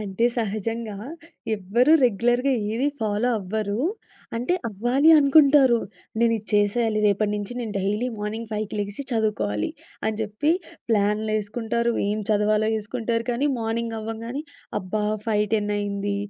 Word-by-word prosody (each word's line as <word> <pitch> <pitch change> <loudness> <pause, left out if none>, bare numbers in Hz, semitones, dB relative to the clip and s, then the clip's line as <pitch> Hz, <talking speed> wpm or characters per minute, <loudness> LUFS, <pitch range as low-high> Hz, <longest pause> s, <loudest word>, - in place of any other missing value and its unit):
అంటే 205 +2 -1
సహజంగా 220 0 -2 0.6
ఎవ్వరూ 235 +9 +3
రెగ్యులర్‌గా 240 +4 +2 0.2
ఏది 255 +5 0
ఫాలో 215 +2 0
అవ్వరు. 205 +1 -2 0.6
అంటే 250 +10 0
అవ్వాలి 245 +9 +3
అనుకుంటారు. 280 -3 +6 0.4
నేనిది 230 -2 +2
చేసేయాలి, 215 +2 +2
రేపటి 205 +1 +2
నుంచి 205 +2 -4
నేను 225 -3 -4
డైలీ 210 +5 0
మార్నింగ్ 215 +2 -4
5కి 215 0 -3
లెగిసి 205 +6 -4
చదువుకోవాలి 155 - 0 0.3
అని 220 -1 0
చెప్పి 220 +8 0 0.4
ప్లాన్లేసుకుంటారు, 215 +2 0 0.2
ఏం 210 +1 0
చదవాలో 210 +1 +2
ఏసుకుంటారు 230 +1 -2
కానీ, 245 +5 0
మార్నింగ్ 225 +1 -2
అవ్వంగానే, 230 +5 -5 0.4
అబ్బా! 210 +3 -2 0.2
5:10 210 -1 +1
అయింది. 200 0 -2
220 Hz, 120 wpm, -24 LUFS, 205-235 Hz, 0.6 s, అనుకుంటారు